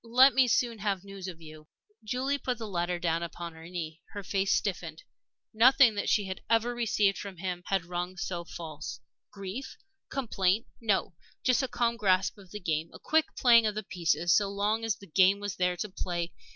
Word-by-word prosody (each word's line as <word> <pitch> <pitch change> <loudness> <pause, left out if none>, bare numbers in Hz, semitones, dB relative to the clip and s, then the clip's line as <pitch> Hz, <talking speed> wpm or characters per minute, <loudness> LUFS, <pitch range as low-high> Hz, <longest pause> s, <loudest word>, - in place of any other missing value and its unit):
Let 255 +4 +6
me 260 -1 +4
soon 235 -1 +1
have 200 -3 -1
news 195 -1 -8
of 170 -3 -8
you." 155 -1 -12 0.4
Julie 260 +5 -1
put 250 -2 -2
the 225 -1 -6
letter 175 -2 -1
down 170 -1 0
upon 170 0 -6
her 160 +1 -11
knee. 165 -2 -6
Her 205 - -5
face 195 +1 0
stiffened. 165 -5 -1 0.5
Nothing 250 +2 +6
that 205 - -2
she 205 - +2
had 190 0 -6
ever 230 +1 +2
received 210 -4 +1
from 200 -3 -7
him 180 0 -3
yet 175 - -27 0.2
had - - -17
rung 180 +1 -4
so 175 -1 -3
false. 155 -6 -7 0.3
Grief? 200 +6 -7 0.3
Complaint? 215 -5 0
No! 200 -5 0 0.3
Just 255 +1 +3
a 265 - -1
calm 235 -1 0
grasp 190 -1 +2
of 190 -2 -15
the 210 - -7
game 160 -3 -1
a - - -10
quick 315 0 +2
playing 235 -3 +6
of 210 - -2
the 215 - -3
pieces 170 -1 +1
so 200 -1 +2
long 205 +3 0
as 225 -3 0
the 200 - -14
game 190 +3 +4
was 205 -1 -4
there 180 -1 +1
to 210 - -3
play. 175 -2 -3
195 Hz, 205 wpm, -29 LUFS, 175-225 Hz, 0.5 s, Let